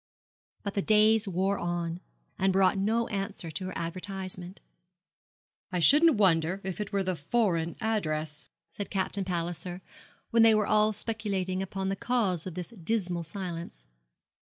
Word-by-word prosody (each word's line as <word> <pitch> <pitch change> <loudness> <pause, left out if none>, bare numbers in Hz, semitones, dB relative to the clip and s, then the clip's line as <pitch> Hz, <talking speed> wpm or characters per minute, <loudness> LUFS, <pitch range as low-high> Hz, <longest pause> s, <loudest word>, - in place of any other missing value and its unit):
But 200 - -3
the 200 - 0
days 215 +1 +4
wore 190 +2 0
on, 175 0 -2 0.4
and 190 0 +3
brought 190 0 +4
no 220 +4 +1
answer 195 -4 -4
to 185 +5 -5
her 185 - -5
advertisement. 185 +1 -5 1.1
'I 180 - -1
shouldn't 300 - +6
wonder 180 -2 +3
if 190 +2 -4
it 210 - -4
were 200 -1 +1
the 185 -1 -1
foreign 170 0 0
address,' 155 -9 -2 0.2
said 195 +5 -6
Captain 195 0 -1
Palliser, 175 0 -3 0.5
when 230 - +5
they 225 -1 +7
were 210 -1 +2
all 215 +1 +4
speculating 200 -4 -2
upon 190 0 -3
the 195 - 0
cause 195 -7 0
of 180 - -6
this 180 -2 -5
dismal 185 -4 -2
silence. 170 - -6
190 Hz, 150 wpm, -29 LUFS, 175-210 Hz, 1.1 s, they